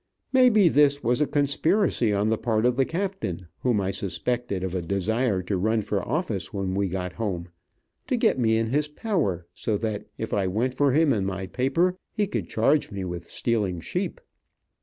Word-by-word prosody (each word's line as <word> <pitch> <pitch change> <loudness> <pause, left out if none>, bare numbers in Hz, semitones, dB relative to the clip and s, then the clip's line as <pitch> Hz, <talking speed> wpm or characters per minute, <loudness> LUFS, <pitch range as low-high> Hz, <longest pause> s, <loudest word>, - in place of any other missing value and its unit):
May 255 -1 +7
be 215 -5 +5
this 145 -2 +4
was 120 +4 +2
a 150 - +3
conspiracy 145 - +2
on 100 +1 +1
the 110 - +1
part 110 -1 +1
of 125 0 +3
the 135 +1 +2
captain, 180 - -3
whom 120 -5 +1
I 95 -1 0
suspected 100 +2 -2
of 95 -1 -3
a 90 - -1
desire 100 +3 0
to 95 +1 -1
run 110 +3 +1
for 100 -1 -1
office 115 - -2
when 95 -2 -2
we 100 +1 +1
got 90 0 -4
home, 90 -6 -3 0.6
to - - +1
get - - +2
me 110 -2 +3
in 115 0 -1
his 150 +2 +1
power, 150 - -1
so 110 -2 -1
that 110 -1 -3
if - - -4
I 100 -2 +1
went 115 +7 0
for 140 0 +2
him 150 0 +4
in 105 -4 0
my 95 0 -3
paper, 140 - +1
he 210 - 0
could 200 - -4
charge 135 +7 +2
me 100 -2 -4
with 85 -1 -6
stealing 105 -7 -1
sheep. - - -3
110 Hz, 200 wpm, -25 LUFS, 95-140 Hz, 0.6 s, May